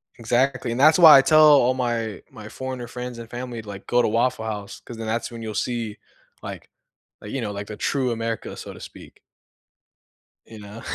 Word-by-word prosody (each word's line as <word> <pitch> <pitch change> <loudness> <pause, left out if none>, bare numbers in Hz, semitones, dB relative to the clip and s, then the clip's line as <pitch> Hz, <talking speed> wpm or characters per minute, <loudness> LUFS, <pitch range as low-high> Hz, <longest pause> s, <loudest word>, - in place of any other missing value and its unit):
Exactly, 125 +2 0
and 120 - -3
that's 155 +3 +6
why 160 -5 +10
I - - +7
tell 155 +3 +5
all 140 -4 +6
my 115 -5 -2
my 110 -1 -11
foreigner 130 -1 -6
friends 125 -1 -7
and 115 -1 -10
family, 120 -1 -6
like, 100 -2 -10
"Go 125 - +2
to - - +1
Waffle 115 +1 0
House," 105 -2 -6
'cause 120 - -10
then 115 - -6
that's 115 +2 -2
when 115 -1 -8
you'll 110 -1 -5
see, 115 -1 -3 0.4
like - - -9 0.5
like, 105 - -9
you 135 - -3
know, 105 -3 -3
like, 100 0 -6
the 105 - -7
true 130 -3 -1
America, 115 -1 -4
so - - -9
to - - -13
speak. - - -13 1.3
You 110 -1 -12
know? 105 +2 -11
120 Hz, 205 wpm, -23 LUFS, 110-130 Hz, 1.3 s, why